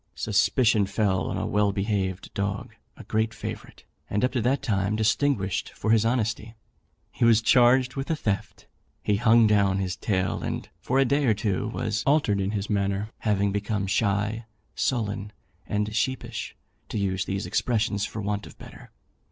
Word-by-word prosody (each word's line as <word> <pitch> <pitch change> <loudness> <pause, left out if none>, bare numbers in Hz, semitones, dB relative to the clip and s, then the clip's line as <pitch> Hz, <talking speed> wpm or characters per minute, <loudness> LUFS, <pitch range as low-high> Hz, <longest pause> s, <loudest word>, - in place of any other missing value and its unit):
Suspicion 110 0 +2
fell 95 -4 0
on - - -2
a - - -2
well 105 -1 +2
behaved 100 -2 -2
dog 100 0 -3 0.2
a - - -10
great 110 0 -1
favourite, 105 - -7 0.3
and 105 +4 +1
up 125 - -1
to 125 -2 -1
that 130 +5 +1
time 100 -1 0
distinguished 110 -2 +1
for 110 - -1
his 115 0 +4
honesty. 115 -1 -1 0.6
He - - -3
was 115 -2 +6
charged 125 +2 +4
with 135 0 -3
the 160 - 0
theft; 105 -9 -3 0.4
he 105 - +2
hung 115 +1 +5
down 100 -3 +3
his 95 -1 -2
tail, 95 -3 -1
and - - -4
for 130 - -1
a 135 - +5
day 140 +3 +2
or 110 -4 +3
two 100 -1 -1
was 110 -2 -2
altered 135 -9 +3
in 95 - -1
his 100 -1 -2
manner, 100 +1 -1
having 100 -2 +1
become 105 0 -1
shy, 105 +3 0 0.3
sullen, 105 -4 -2 0.3
and 105 +1 -1
sheepish, 120 -2 -2 0.3
to - - -3
use 95 -2 -1
these 95 +1 -3
expressions 110 -4 0
for 105 -1 -4
want 105 0 -2
of - - -14
better. - - -13
105 Hz, 170 wpm, -26 LUFS, 100-115 Hz, 0.6 s, was